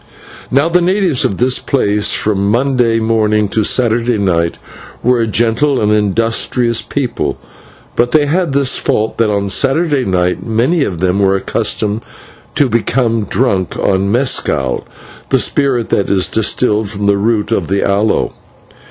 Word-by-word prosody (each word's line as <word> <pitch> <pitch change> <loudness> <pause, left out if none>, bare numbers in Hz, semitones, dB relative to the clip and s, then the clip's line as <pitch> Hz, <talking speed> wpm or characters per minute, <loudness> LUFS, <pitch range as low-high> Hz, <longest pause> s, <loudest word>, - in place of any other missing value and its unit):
Now 140 +5 +2
the 175 +1 +2
natives 180 -5 +1
of 95 - -1
this 125 +1 +1
place, 105 -6 0
from 100 -2 0
Monday 120 -1 +1
morning 110 -2 +1
to 110 - 0
Saturday 120 0 +1
night, 85 -4 0 0.5
were 125 0 +2
a 115 - 0
gentle 120 +6 +1
and 105 0 +1
industrious 115 +3 +1
people, 135 -4 -3 0.6
but 120 +1 +1
they 155 -2 +3
had 170 +2 0
this 140 -1 +1
fault, 110 +2 -1
that 115 -2 +2
on 100 -1 0
the 100 - -4
Saturday 140 - +1
night 90 -3 -1
many 125 +9 +1
of 90 -9 -4
them 95 +1 +1
were 95 -1 +2
accustomed 105 +2 -1 0.5
to 145 - +3
become 115 -1 0
drunk 100 -5 -1
on 100 0 0
/mescal/, 115 - 0 0.4
the - - +3
spirit 130 -5 0
that 100 - 0
is 95 -2 +2
distilled 110 -1 0
from 105 -1 -6
the 100 0 +2
root 110 0 0
of 95 -7 0
the 100 +1 0
aloe. 100 +2 0
115 Hz, 155 wpm, -14 LUFS, 100-130 Hz, 0.6 s, they